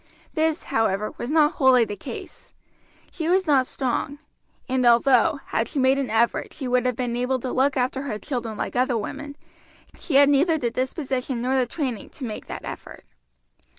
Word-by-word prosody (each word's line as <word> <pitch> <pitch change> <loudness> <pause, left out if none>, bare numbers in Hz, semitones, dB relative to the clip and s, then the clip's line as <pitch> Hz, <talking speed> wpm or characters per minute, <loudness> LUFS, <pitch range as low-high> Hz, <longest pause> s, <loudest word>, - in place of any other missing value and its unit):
This, 320 -1 0
however, 215 -2 +1
was 240 - -4
not 305 0 +4
wholly 260 -4 +4
the 205 - -5
case. - - -10 0.6
She 325 -2 -3
was 375 +1 +3
not 270 -5 +3
strong; 270 +2 -2 0.5
and 255 0 0
although, 255 +5 +4
had 225 - -1
she - - -7
made 265 +1 +3
an 270 -4 -2
effort, 225 +2 +1
she 270 - -5
would 250 0 +2
have 250 - 0
been 245 -1 -2
able 250 +2 0
to 250 +1 -4
look 270 +1 +1
after 255 +1 0
her 260 -7 -4
children 230 -3 -4
like - - -4
other 250 -1 +2
women, 285 +6 -6 0.6
she 310 - -4
had 280 +1 +7
neither 310 +4 +3
the 240 -6 -1
disposition 260 -1 -2
nor 255 +3 0
the 255 -2 +2
training 255 -5 -4
to 270 - -7
make 215 -3 -6
that - - -7
effort. - - -9
260 Hz, 185 wpm, -24 LUFS, 240-285 Hz, 0.6 s, had